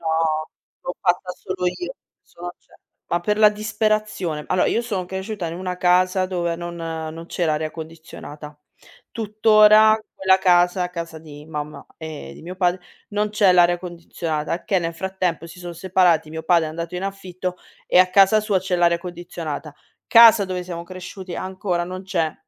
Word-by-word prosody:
No. 160 Hz, -1 st, 0 dB, 0.4 s
L'ho 180 Hz, -, -4 dB
fatta 180 Hz, 0 st, 0 dB
solo 185 Hz, 0 st, -4 dB
io. 355 Hz, -, -3 dB, 0.3 s
Sono 175 Hz, +1 st, -9 dB
cert -, -, -25 dB, 0.3 s
ma 175 Hz, -, 0 dB
per 210 Hz, +4 st, 0 dB
la 215 Hz, -1 st, +7 dB
disperazione. 215 Hz, -6 st, -1 dB
Allora 185 Hz, -, +2 dB
io -, -, +1 dB
sono 205 Hz, -6 st, -3 dB
cresciuta 190 Hz, +1 st, -5 dB
in 165 Hz, -, -5 dB
una 180 Hz, -1 st, -4 dB
casa 185 Hz, +1 st, +3 dB
dove 175 Hz, -2 st, -2 dB
non 175 Hz, 0 st, -6 dB
non 165 Hz, 0 st, -6 dB
c'era 170 Hz, -3 st, 0 dB
aria 155 Hz, 0 st, -2 dB
condizionata. 155 Hz, -2 st, -10 dB, 0.5 s
Tuttora 215 Hz, 0 st, +5 dB, 0.2 s
quella 190 Hz, 0 st, +3 dB
casa, 180 Hz, -1 st, +3 dB
casa 165 Hz, -2 st, -6 dB
di 150 Hz, -2 st, -12 dB
mamma 150 Hz, -1 st, -6 dB
e 160 Hz, -2 st, -8 dB
di -, -, -13 dB
mio 180 Hz, +3 st, -8 dB
padre, 180 Hz, 0 st, +1 dB, 0.3 s
non 210 Hz, 0 st, 0 dB
c'è 205 Hz, -3 st, +4 dB
l'aria 175 Hz, 0 st, +4 dB
condizionata, 170 Hz, -2 st, -4 dB
che 195 Hz, -, +2 dB
nel 165 Hz, 0 st, -3 dB
frattempo 185 Hz, -2 st, -2 dB
si 170 Hz, -, -12 dB
son 175 Hz, -1 st, -7 dB
separati, 175 Hz, -3 st, +2 dB
mio 160 Hz, 0 st, -5 dB
padre 170 Hz, 0 st, +3 dB
è -, -, -4 dB
andato 170 Hz, +2 st, -5 dB
in 185 Hz, -, -4 dB
affitto, 185 Hz, -2 st, -5 dB, 0.3 s
e -, -, +4 dB
a 185 Hz, 0 st, +6 dB
casa 195 Hz, +3 st, +5 dB
sua 210 Hz, -3 st, +1 dB
c'è 185 Hz, 0 st, -2 dB
l'aria 170 Hz, -1 st, +3 dB
condizionata. 170 Hz, -4 st, -6 dB, 0.3 s
Casa 230 Hz, -3 st, +8 dB
dove 185 Hz, -1 st, -4 dB
siamo 170 Hz, -2 st, -6 dB
cresciuti 185 Hz, +1 st, -8 dB
ancora 185 Hz, -2 st, -2 dB
non 185 Hz, +1 st, -7 dB
c'è 170 Hz, -5 st, -1 dB
180 Hz, 170 wpm, -22 LUFS, 165-190 Hz, 0.5 s, Casa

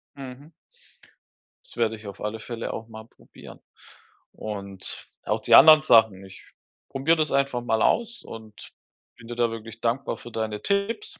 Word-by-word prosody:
Mhm. 135 Hz, +3 st, -10 dB, 1.1 s
Das -, -, -10 dB
werde 115 Hz, -1 st, +1 dB
ich 110 Hz, -1 st, -12 dB
auf 100 Hz, -, -10 dB
alle 105 Hz, +1 st, -4 dB
Fälle 115 Hz, +1 st, -5 dB
auch 110 Hz, -, -7 dB
mal 110 Hz, -1 st, -11 dB
probieren -, -, -16 dB, 0.7 s
und 100 Hz, -3 st, -5 dB, 0.2 s
auch -, -, -1 dB
die -, -, +5 dB
anderen 155 Hz, -1 st, +9 dB
Sachen, 110 Hz, -7 st, +4 dB
ich 95 Hz, -, -14 dB, 0.5 s
probiere 155 Hz, +5 st, +1 dB
das 155 Hz, -1 st, 0 dB
einfach 140 Hz, -3 st, +1 dB
mal 110 Hz, -2 st, 0 dB
aus 235 Hz, 0 st, 0 dB
und 110 Hz, -2 st, -11 dB, 0.5 s
bin 115 Hz, -, -14 dB
dir 120 Hz, -, -6 dB
da 120 Hz, -1 st, +1 dB
wirklich 115 Hz, 0 st, -9 dB
dankbar 120 Hz, 0 st, -1 dB
für 120 Hz, -, -12 dB
deine 110 Hz, -2 st, -3 dB
Tipps. 200 Hz, -, -2 dB
115 Hz, 160 wpm, -25 LUFS, 110-140 Hz, 1.1 s, anderen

